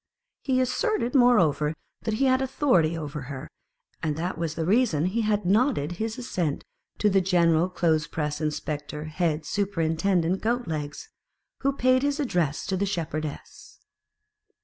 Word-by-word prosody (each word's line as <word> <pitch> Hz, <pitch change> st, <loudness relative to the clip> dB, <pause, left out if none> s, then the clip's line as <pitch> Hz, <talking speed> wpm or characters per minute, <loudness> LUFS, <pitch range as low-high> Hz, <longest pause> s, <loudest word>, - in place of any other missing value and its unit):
He 260 Hz, -2 st, +1 dB
asserted, 255 Hz, -, 0 dB
moreover, 175 Hz, -, +4 dB, 0.3 s
that 220 Hz, -1 st, 0 dB
he 270 Hz, -, +1 dB
had 260 Hz, 0 st, +3 dB
authority 250 Hz, -, +2 dB
over 150 Hz, -2 st, -5 dB
her, 140 Hz, +1 st, -6 dB, 0.5 s
and 155 Hz, -2 st, -1 dB
that 175 Hz, +4 st, -3 dB
was 160 Hz, -1 st, -3 dB
the 165 Hz, -, -2 dB
reason 195 Hz, -, +2 dB
he 205 Hz, +6 st, 0 dB
had 210 Hz, -2 st, 0 dB
nodded 200 Hz, -, +2 dB
his 220 Hz, +5 st, -3 dB
assent 180 Hz, -, -2 dB, 0.3 s
to 210 Hz, -, +2 dB
the 195 Hz, -1 st, +4 dB
General 175 Hz, -2 st, +3 dB
clothes 160 Hz, -3 st, +1 dB
press 150 Hz, -1 st, -3 dB
inspector 150 Hz, -1 st, -3 dB
head 155 Hz, 0 st, -1 dB
superintendent 185 Hz, -2 st, 0 dB
Goat 240 Hz, +1 st, 0 dB
legs, 150 Hz, -, -4 dB, 0.5 s
who 275 Hz, -, +1 dB
paid 255 Hz, -1 st, +3 dB
his 285 Hz, +1 st, 0 dB
addresses 175 Hz, -, 0 dB
to 190 Hz, -, -1 dB
the 200 Hz, +2 st, 0 dB
Shepherdess. 155 Hz, -5 st, -5 dB
180 Hz, 150 wpm, -26 LUFS, 155-235 Hz, 0.5 s, moreover